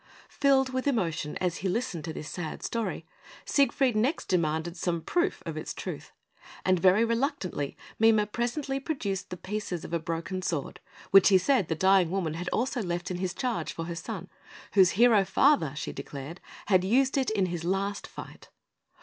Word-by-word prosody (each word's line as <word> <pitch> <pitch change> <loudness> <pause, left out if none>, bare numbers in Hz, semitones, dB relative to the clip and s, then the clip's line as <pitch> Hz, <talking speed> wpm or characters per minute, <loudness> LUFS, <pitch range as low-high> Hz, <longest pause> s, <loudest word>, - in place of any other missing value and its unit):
Filled 265 -2 +3
with 260 +2 -1
emotion 165 - -1
as 180 -2 -1
he 190 - -2
listened 195 -5 -2
to 165 - -4
this 155 - -7
sad 160 -1 -5
story, 230 -1 -3 0.4
Siegfried 270 -3 +2
next 255 +10 0
demanded 170 -1 0
some 175 -1 -1
proof 350 -1 0
of - - -5
its - - -5
truth; - - -6 0.5
and 185 -1 +3
very 190 +5 +5
reluctantly 230 - -2 0.2
Mime 220 -1 +5
presently 270 +5 -2
produced 250 - -3
the 180 - -6
pieces 190 -3 -4
of - - -8
a 170 - +1
broken 165 +3 -4
sword, 160 -6 -3 0.3
which 195 0 +8
he 190 - +7
said 205 - +2
the 160 - -1
dying 190 0 +4
woman 175 -4 -1
had 175 +3 -4
also 250 +1 -1
left 175 -1 -3
in 180 - -2
his 180 -1 -3
charge 235 -11 -2
for 165 - -5
her 170 - -4
son, 185 +1 -6 0.5
whose 190 -3 +5
hero 230 -3 +6
father, 195 - +3
she - - -4
declared, 145 +5 -8 0.2
had 185 -3 +3
used 260 +7 +2
it 265 -2 +1
in 205 -3 +1
his 175 -2 -4
last 195 +3 -1
fight. - - -11
190 Hz, 180 wpm, -28 LUFS, 170-235 Hz, 0.5 s, which